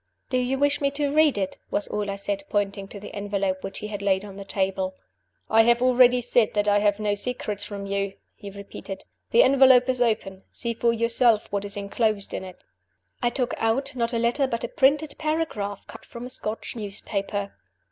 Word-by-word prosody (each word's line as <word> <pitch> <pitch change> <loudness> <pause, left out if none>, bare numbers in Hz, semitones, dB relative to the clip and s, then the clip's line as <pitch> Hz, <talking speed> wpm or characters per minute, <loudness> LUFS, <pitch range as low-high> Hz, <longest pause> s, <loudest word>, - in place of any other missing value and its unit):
"Do 255 - +2
you 250 +2 0
wish 285 +1 +1
me 280 - +3
to 290 -1 0
read 305 -5 +4
it?" 190 -2 -3
was 205 - -1
all 210 -1 -3
I 200 - -2
said 200 0 -3
pointing 200 -1 -1
to 200 - -9
the 205 - -10
envelope 200 -2 -2
which 195 - -6
he 210 - -5
had 205 -1 -5
laid 195 0 +1
on 200 -2 -10
the 200 - -7
table. 190 -1 -2 0.5
"I 225 - +5
have 235 +1 +4
already 250 0 +5
said 235 -2 +2
that 205 0 +1
I 205 0 +4
have 205 0 +2
no 210 -1 0
secrets 205 -2 -3
from 200 -1 -6
you," 200 0 -2 0.2
he 205 - -10
repeated. 200 -1 -8 0.3
"The 475 - +6
envelope 260 -2 +6
is 255 -1 +1
open. 200 -5 0
See 235 -1 -3
for 235 +1 +2
yourself 230 -1 +2
what 200 0 -2
is 200 0 -3
inclosed 205 0 -1
in - - -3
it." 185 -1 -10 0.6
I 240 - +2
took 245 0 -2
out 265 +5 0
not 235 -1 0
a 235 - -1
letter, 240 +4 +1
but 230 -2 -3
a - - -1
printed 285 +3 +2
paragraph, 305 -11 -2
cut - - -12
from 235 +1 -9
a - - -7
Scotch 220 -2 -4
newspaper. 200 -1 -3
215 Hz, 210 wpm, -25 LUFS, 200-250 Hz, 0.6 s, The